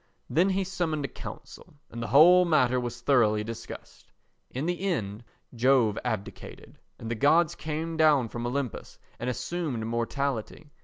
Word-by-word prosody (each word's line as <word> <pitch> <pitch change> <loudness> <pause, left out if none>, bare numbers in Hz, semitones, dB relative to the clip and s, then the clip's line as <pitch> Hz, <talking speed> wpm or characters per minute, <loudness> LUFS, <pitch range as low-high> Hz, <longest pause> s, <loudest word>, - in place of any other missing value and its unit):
Then 170 +9 +3
he 195 0 0
summoned 175 -6 -2
a - - -2
council 140 - -11 0.2
and 115 - -6
the 115 - -3
whole 175 +6 +7
matter 130 -7 +2
was 120 -1 -5
thoroughly 115 -6 +3
discussed. 115 +1 -10 0.4
In 130 +4 -4
the 175 +1 -2
end 115 - -2 0.3
Jove 120 -3 +3
abdicated, 110 -5 -6 0.2
and 115 - -6
the - - +1
gods 150 +7 +3
came 160 +1 -4
down 150 -6 +4
from 120 +2 -5
Olympus 130 -1 -4 0.2
and 125 - -2
assumed 125 -1 -3
mortality. 125 +4 -3
135 Hz, 150 wpm, -27 LUFS, 115-160 Hz, 0.4 s, whole